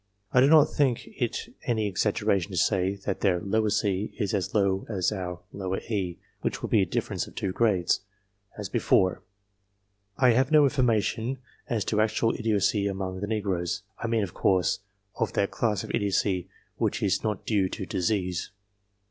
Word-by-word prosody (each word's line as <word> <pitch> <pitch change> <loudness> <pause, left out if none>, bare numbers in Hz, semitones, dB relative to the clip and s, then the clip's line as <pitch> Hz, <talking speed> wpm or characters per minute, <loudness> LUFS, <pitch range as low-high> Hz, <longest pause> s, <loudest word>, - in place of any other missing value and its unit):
I 125 - +6
do 135 - +6
not 155 0 +8
think 135 -5 0
it - - -3
any 110 -3 +1
exaggeration 100 -1 +1
to 95 - -5
say, 95 +2 +2
that 100 - -2
their 90 -4 +3 0.3
c 100 -1 0
is 105 -3 -1
as 95 -5 -1
low 100 -2 +2
as 95 -4 0
our 90 -3 -4 0.5
e, 95 -6 -2 0.2
which - - -2
would - - -3
be - - +5
a - - +1
difference - - -2
of - - -14
two 95 - -2
grades, 95 -5 +2 0.6
as - - -4
before. 95 -1 +2 1.0
I 125 -2 +5
have 130 +4 +2
no 155 -1 +7
information 125 -2 +1 0.3
as 110 -5 0
to 110 -1 +1
actual 110 +1 +1
idiocy 105 -2 +1
among 95 -1 -3
the 105 - -3
negroes 100 -3 -1 0.2
I 115 - -2
mean, 115 -2 +1
of 90 - -5
course, 90 -3 +2 0.4
of 115 -3 -1
that 100 - +1
class 110 -4 0
of - - -6
idiocy 95 -2 0 0.3
which - - -1
is - - +1
not 105 -3 -2
due 100 -4 +1
to 95 - -5
disease. 90 -1 -1
100 Hz, 170 wpm, -27 LUFS, 95-115 Hz, 1.0 s, not